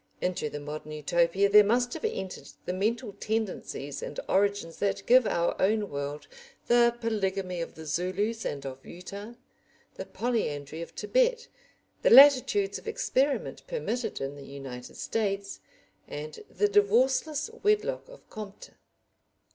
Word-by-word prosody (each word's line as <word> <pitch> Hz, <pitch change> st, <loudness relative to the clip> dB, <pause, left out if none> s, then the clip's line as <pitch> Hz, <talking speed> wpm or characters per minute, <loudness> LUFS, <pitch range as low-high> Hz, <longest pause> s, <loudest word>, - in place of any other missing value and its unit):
Into 180 Hz, -4 st, -1 dB
the 145 Hz, -, -6 dB
modern 150 Hz, +1 st, -7 dB
Utopia 170 Hz, +5 st, +2 dB
there 210 Hz, +1 st, +8 dB
must 245 Hz, +4 st, +1 dB
have -, -, -7 dB
entered 190 Hz, -, -4 dB, 0.2 s
the 180 Hz, -, -2 dB
mental 215 Hz, +3 st, -1 dB
tendencies 195 Hz, -10 st, -3 dB
and 145 Hz, -, -5 dB
origins 200 Hz, -4 st, +1 dB
that 200 Hz, -1 st, -1 dB
give 250 Hz, -2 st, +6 dB
our 170 Hz, 0 st, +1 dB
own 210 Hz, +1 st, +1 dB
world 145 Hz, +1 st, -5 dB, 0.4 s
the 240 Hz, 0 st, +4 dB
polygamy 195 Hz, -5 st, -1 dB
of 165 Hz, -, -6 dB
the 160 Hz, -, -9 dB
Zulus 185 Hz, +8 st, -1 dB
and 140 Hz, -1 st, -4 dB
of 135 Hz, 0 st, -7 dB
Utah, 200 Hz, +5 st, -9 dB, 0.6 s
the -, -, -5 dB
polyandry 160 Hz, -, -2 dB
of 170 Hz, -, -9 dB
Tibet, -, -, +1 dB, 0.5 s
the -, -, +4 dB
latitudes 250 Hz, -7 st, +7 dB
of -, -, -16 dB
experiment 280 Hz, -10 st, 0 dB
permitted 245 Hz, -, -3 dB
in 135 Hz, +1 st, -3 dB
the 140 Hz, -, -10 dB
United 135 Hz, -3 st, -8 dB
States, 200 Hz, -3 st, -2 dB, 0.5 s
and 150 Hz, -, -7 dB
the 415 Hz, -, +1 dB
divorceless 310 Hz, -, +2 dB
wedlock 430 Hz, +4 st, +1 dB
of -, -, -15 dB
Comte. 205 Hz, -2 st, -9 dB
200 Hz, 140 wpm, -28 LUFS, 165-245 Hz, 0.6 s, there